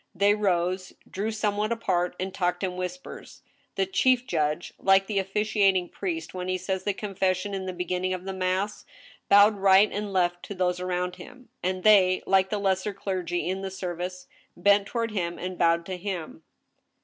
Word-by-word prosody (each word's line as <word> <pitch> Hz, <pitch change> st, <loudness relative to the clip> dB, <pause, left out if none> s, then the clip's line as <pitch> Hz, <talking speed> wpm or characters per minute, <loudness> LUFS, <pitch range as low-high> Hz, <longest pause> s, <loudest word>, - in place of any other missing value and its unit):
They 200 Hz, +3 st, +4 dB
rose, 185 Hz, -2 st, 0 dB
drew 205 Hz, +3 st, -3 dB
somewhat 215 Hz, 0 st, -1 dB
apart, 180 Hz, -6 st, 0 dB
and 185 Hz, +1 st, -3 dB
talked 180 Hz, 0 st, -1 dB
in 185 Hz, -1 st, -2 dB
whispers. 185 Hz, +10 st, -7 dB, 0.3 s
The 390 Hz, -, +1 dB
chief 260 Hz, -10 st, +2 dB
judge, 155 Hz, -4 st, -1 dB
like 195 Hz, 0 st, +4 dB
the 200 Hz, -1 st, 0 dB
officiating 195 Hz, -2 st, +1 dB
priest 165 Hz, -4 st, -4 dB
when 180 Hz, 0 st, -5 dB
he 185 Hz, 0 st, 0 dB
says 185 Hz, 0 st, -3 dB
the 205 Hz, -, +1 dB
confession 195 Hz, -1 st, -1 dB
in 190 Hz, -1 st, -4 dB
the -, -, -2 dB
beginning 180 Hz, +1 st, -2 dB
of 185 Hz, 0 st, -4 dB
the 195 Hz, -, -4 dB
mass, 190 Hz, +2 st, -1 dB, 0.5 s
bowed 205 Hz, +1 st, +6 dB
right 195 Hz, +1 st, +5 dB
and 205 Hz, 0 st, -4 dB
left 175 Hz, -2 st, +1 dB
to 200 Hz, -, -7 dB
those 180 Hz, -1 st, 0 dB
around 180 Hz, 0 st, -2 dB
him, 255 Hz, -2 st, -13 dB
and 185 Hz, 0 st, -2 dB
they, 190 Hz, -4 st, +5 dB
like 190 Hz, 0 st, +3 dB
the 210 Hz, -, -1 dB
lesser 195 Hz, 0 st, 0 dB
clergy 180 Hz, -3 st, -3 dB
in 190 Hz, +1 st, -2 dB
the 195 Hz, -, -4 dB
service, 180 Hz, -1 st, -5 dB, 0.3 s
bent 200 Hz, +2 st, +4 dB
toward 230 Hz, -2 st, -2 dB
him 175 Hz, -4 st, -2 dB
and 185 Hz, 0 st, -6 dB
bowed 170 Hz, 0 st, +3 dB
to 185 Hz, 0 st, -5 dB
him. 175 Hz, -4 st, -5 dB
190 Hz, 180 wpm, -26 LUFS, 180-205 Hz, 0.5 s, bowed